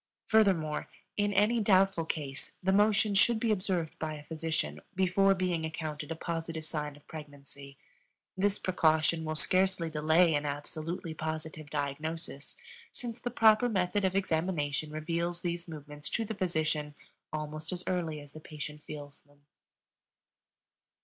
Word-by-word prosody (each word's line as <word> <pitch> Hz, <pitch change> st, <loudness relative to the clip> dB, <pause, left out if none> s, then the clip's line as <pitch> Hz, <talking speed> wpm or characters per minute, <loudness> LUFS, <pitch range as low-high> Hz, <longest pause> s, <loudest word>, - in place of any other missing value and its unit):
Furthermore, 185 Hz, -9 st, +3 dB, 0.3 s
in 205 Hz, 0 st, +1 dB
any 210 Hz, +4 st, +3 dB
doubtful 195 Hz, -4 st, +4 dB
case, 145 Hz, -4 st, -4 dB
the 190 Hz, -, +3 dB
motion 210 Hz, +1 st, +4 dB
should 220 Hz, +3 st, +5 dB
be 225 Hz, 0 st, +1 dB
observed 185 Hz, -5 st, -1 dB
by 155 Hz, -1 st, -2 dB
a 150 Hz, -, -9 dB
physician 155 Hz, -, -2 dB
before 190 Hz, +1 st, +4 dB
being 180 Hz, -3 st, 0 dB
accounted 155 Hz, -1 st, -4 dB
a -, -, -1 dB
positive 165 Hz, -1 st, -4 dB
sign 150 Hz, -2 st, -3 dB
of 145 Hz, -, -18 dB
pregnancy. 140 Hz, -2 st, -10 dB, 0.6 s
This 200 Hz, +1 st, +2 dB
precaution 160 Hz, -2 st, +2 dB
will 155 Hz, 0 st, -2 dB
scarcely 185 Hz, 0 st, +3 dB
delay 160 Hz, +2 st, +4 dB
an 145 Hz, 0 st, +1 dB
absolutely 155 Hz, +4 st, -4 dB
positive 155 Hz, -1 st, -5 dB
diagnosis, 150 Hz, +1 st, -4 dB, 0.3 s
since 240 Hz, -1 st, -6 dB
the 245 Hz, -, -2 dB
proper 225 Hz, 0 st, +5 dB
method 195 Hz, -1 st, +1 dB
of 190 Hz, 0 st, +1 dB
examination 160 Hz, -5 st, 0 dB
reveals 170 Hz, +3 st, -2 dB
these 175 Hz, 0 st, -2 dB
movements 150 Hz, -2 st, -8 dB
to 225 Hz, -, 0 dB
the 220 Hz, -, -3 dB
physician 155 Hz, -6 st, -1 dB, 0.4 s
almost 155 Hz, +1 st, -4 dB
as 180 Hz, 0 st, -3 dB
early 165 Hz, -4 st, -1 dB
as 145 Hz, -1 st, -13 dB
the 155 Hz, -, -10 dB
patient 150 Hz, -1 st, -7 dB
feels 145 Hz, -1 st, -8 dB
them. 145 Hz, 0 st, -27 dB
160 Hz, 145 wpm, -31 LUFS, 150-185 Hz, 0.6 s, should